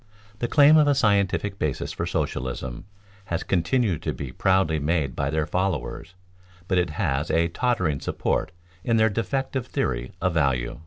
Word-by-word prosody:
The 120 - -1
claim 150 +3 +6
of 150 -1 +5
a 145 - +4
scientific 100 -4 +1
basis 75 -4 -2
for - - -3
socialism 65 -1 -3 0.4
has 85 -1 -2
continued 95 - +1
to - - -2
be 70 -3 -6
proudly 95 -1 +2
made 75 -2 0
by 70 0 -1
their 80 0 0
followers, 90 -1 -3 0.5
but 95 -1 +2
it 90 -1 0
has 65 +3 0
a 85 +1 +2
tottering 90 - 0
support 80 - -1 0.3
in 115 +3 +2
their 110 0 +4
defective 130 +4 -2
theory - - -2
of 90 -1 0
value. 70 -6 0
85 Hz, 160 wpm, -25 LUFS, 75-110 Hz, 0.5 s, claim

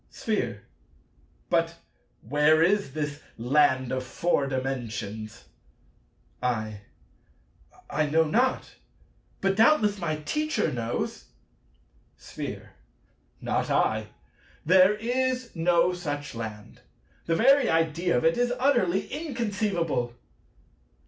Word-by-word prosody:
Sphere. 120 - -3 0.9
But - - +1 0.5
where 150 +4 +4
is 195 -5 +1
this 145 -1 -3 0.2
land 130 +1 +2
of 130 0 -2
Four 140 +2 0
Dimensions? 115 -5 -4 1.0
I. 110 -4 -2 1.1
I 155 0 0
know 160 +2 +3
not: 240 +11 0 0.7
but 195 0 +1
doubtless 215 -3 +4
my 165 -4 -1
Teacher 300 - -1
knows. 115 -1 -3 0.9
Sphere. - - -7 0.7
Not - - -1
I. - - +1 0.6
There 185 +4 +6
is 250 +2 -1
no 170 +1 +3
such 145 -5 -5
land. 110 -2 -8 0.5
The 165 - +2
very 270 +8 +5
idea 165 -2 +1
of 120 - 0
it 165 +8 +3
is 245 0 +2
utterly 240 -9 +2
inconceivable. 205 - -2
165 Hz, 95 wpm, -27 LUFS, 130-210 Hz, 1.1 s, There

